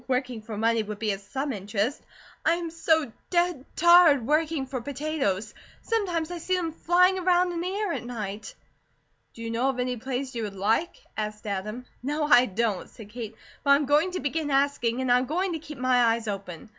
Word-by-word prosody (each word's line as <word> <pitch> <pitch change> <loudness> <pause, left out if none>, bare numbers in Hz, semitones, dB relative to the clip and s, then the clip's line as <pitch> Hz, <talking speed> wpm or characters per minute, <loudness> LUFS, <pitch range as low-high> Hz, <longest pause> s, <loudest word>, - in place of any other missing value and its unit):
Working 255 -3 -1
for 215 -1 -7
money 230 +1 +2
would 210 -1 -6
be 215 0 0
of 195 - -3
some 270 +7 -3
interest. 205 +5 -2 0.4
I 330 - +3
am 340 -1 -4
so 320 -5 +1 0.2
dead 345 -6 +1
tired 340 -6 +6
working 305 0 +1
for 260 -2 -4
potatoes. 265 -7 -2 0.3
Sometimes 355 -8 -1
I 350 - -4
see 370 +3 0
them 340 -3 -1
flying 360 +4 +3
around 360 0 +3
in 340 -1 -3
the 355 - -2
air 400 -1 -1
at - - -4
night." 215 -4 -6 0.8
"Do 230 - -8
you 230 - -3
know 240 +4 +1
of 265 - -2
any 250 0 -1
place 260 +2 -4
you 235 - -3
would 205 -2 -4
like?" 225 - 0
asked 215 0 -4
Adam. 210 +5 -4 0.2
"No, 295 +4 -1
I 255 -4 +6
don't," 210 -1 -1
said 215 -3 -12
Kate, 225 -1 -7 0.3
"but 280 - -1
I 280 - +9
am 290 +1 +1
going 295 +6 +3
to 365 - -2
begin 295 +1 -1
asking 270 -3 +1
and 255 -1 +1
I'm 250 +1 +4
going 360 +5 0
to 320 - -3
keep 300 -1 -10
my 255 -1 +3
eyes 230 -1 +1
open. 195 -2 -6
260 Hz, 205 wpm, -26 LUFS, 225-325 Hz, 0.8 s, I